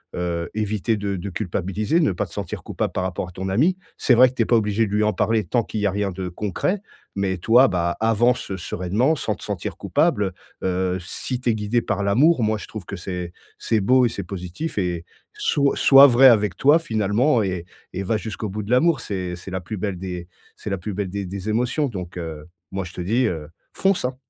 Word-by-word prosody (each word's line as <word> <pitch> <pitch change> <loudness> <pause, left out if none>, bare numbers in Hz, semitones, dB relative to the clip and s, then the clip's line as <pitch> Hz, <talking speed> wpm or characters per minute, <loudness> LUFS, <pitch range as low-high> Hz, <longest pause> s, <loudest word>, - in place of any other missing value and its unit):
heu, 85 -1 -2
éviter 110 +1 0
de 100 -1 -2
de 90 +3 -5
culpabiliser, 100 - -1
ne 155 - +3
pas 85 - -2
te - - -20
sentir - - -5
coupable - - -3
par - - -1
rapport 90 0 -3
à - - -12
ton 95 +2 -5
ami. 155 - +2 0.2
C'est - - +3
vrai 130 +2 +7
que 130 - -15
tu 115 - +2
es - - -3
pas 120 - +3
obligé 110 0 +2
de 100 - -6
lui 105 +1 +1
en 105 - +3
parler 105 +3 +1
tant 115 +6 0
qu'il 110 - -5
y 105 - +2
a - - 0
rien 100 0 -1
de 90 0 -5
concret. 105 - -2 0.3
Mais, 95 -2 -1
toi, 120 +8 +5
bah, 85 -2 -1
avance 115 -1 +1
sereinement 95 - 0
sans 140 - -2
te - - -14
sentir - - -4
coupable, 100 -2 +1 0.3
heu. - - +1
Heu, 95 0 0
si 120 +7 -5
tu 125 - 0
es - - 0
guidé 110 +3 0
par 100 -2 -2
l'amour, 125 +8 +4
moi, 110 0 +1
je - - -9
trouve 105 -6 -8
que 100 - -6
c'est 90 -1 -5 0.3
c'est 110 -2 +1
beau 125 +5 +4
et 120 - +2
c'est 100 - -5
positif 90 - -6
et 90 -3 -2 0.3
soit 140 -1 +1
soit 135 0 +8
vrai 130 +1 +7
avec 105 -4 +4
toi, 145 +4 +5
finalement 115 -1 +1
et 90 -3 -3 0.3
et 95 +2 -3
va 110 +3 0
jusqu'au 110 0 -5
bout 105 +2 -4
de 100 - -9
l'amour. 155 +2 +4
C'est 90 -4 -4
c'est 90 +2 -10
la 95 -1 -3
plus 105 +5 -6
belle 100 -1 -3
des 90 -2 -5 0.3
c'est - - -6
la 95 - 0
plus 100 +3 -5
belle 100 -1 -3
des 100 +1 -4
des 95 +3 -5
émotions 125 +6 +1
donc, 90 -6 -7
heu, 80 -3 -6 0.3
moi, 95 0 -3
je 90 - -10
te - - -5
dis, 115 +8 +1
heu, 80 -6 -4 0.2
fonce, 195 -7 +1
hein. 125 +1 -2
100 Hz, 235 wpm, -22 LUFS, 90-120 Hz, 0.3 s, soit